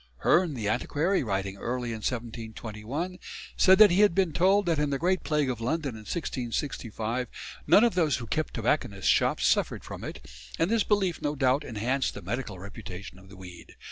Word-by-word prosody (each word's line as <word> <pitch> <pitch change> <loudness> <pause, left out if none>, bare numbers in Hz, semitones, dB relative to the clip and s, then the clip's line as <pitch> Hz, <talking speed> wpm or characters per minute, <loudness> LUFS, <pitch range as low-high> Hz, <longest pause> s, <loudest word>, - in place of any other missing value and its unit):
Hearne, 170 -4 +3
the 110 -4 -3
antiquary, 160 - 0
writing 100 -4 -2
early 120 +2 -3
in 110 - -4
1721, 115 - -5 0.4
said 190 0 +6
that 215 -3 +8
he 180 - +2
had 205 -5 +5
been 185 -5 +2
told 195 +5 +3
that 165 -3 +1
in 150 -1 +1
the 140 - 0
Great 180 +5 0
Plague 150 -2 +1
of 120 -3 -3
London 145 +5 -1
of 110 -1 -11
1665 125 - -3 0.4
none 210 - +7
of 235 - +3
those 160 -6 +2
who 120 - -6
kept 155 +6 -2
tobacconists' 110 -4 -1
shops - - +2
suffered - - +1
from - - -8
it, 65 - -8 0.3
and 165 +5 +1
this 230 -2 +3
belief 195 -5 0
no 145 0 -1
doubt 135 +1 +2
enhanced 125 +2 -1
the - - -8
medical 120 -5 -4
reputation 95 -1 -9
of 95 0 -17
the 100 - -13
weed. 90 -2 -12
130 Hz, 190 wpm, -28 LUFS, 110-170 Hz, 0.4 s, that